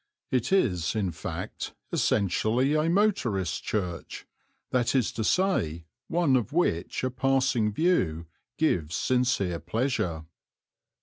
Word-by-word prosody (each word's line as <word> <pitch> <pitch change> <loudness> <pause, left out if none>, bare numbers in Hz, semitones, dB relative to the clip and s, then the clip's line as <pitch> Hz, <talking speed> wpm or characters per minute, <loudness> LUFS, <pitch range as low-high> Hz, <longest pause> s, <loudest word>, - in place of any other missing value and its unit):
It 125 +2 0
is, 90 - +2
in 100 -4 0
fact, 80 - -6 0.2
essentially 110 +7 +1
a 155 +1 +2
motorist's 145 - +1
church 90 -5 -4 0.5
that 125 +1 +1
is 125 -4 +2
to 110 - -3
say, 95 - +1 0.2
one 165 -5 +2
of 125 +1 0
which 150 - 0
a 130 - 0
passing 130 -3 +1
view 95 - +1 0.3
gives 85 - +1
sincere 120 - +1
pleasure. 90 - -1
120 Hz, 115 wpm, -27 LUFS, 90-135 Hz, 0.5 s, is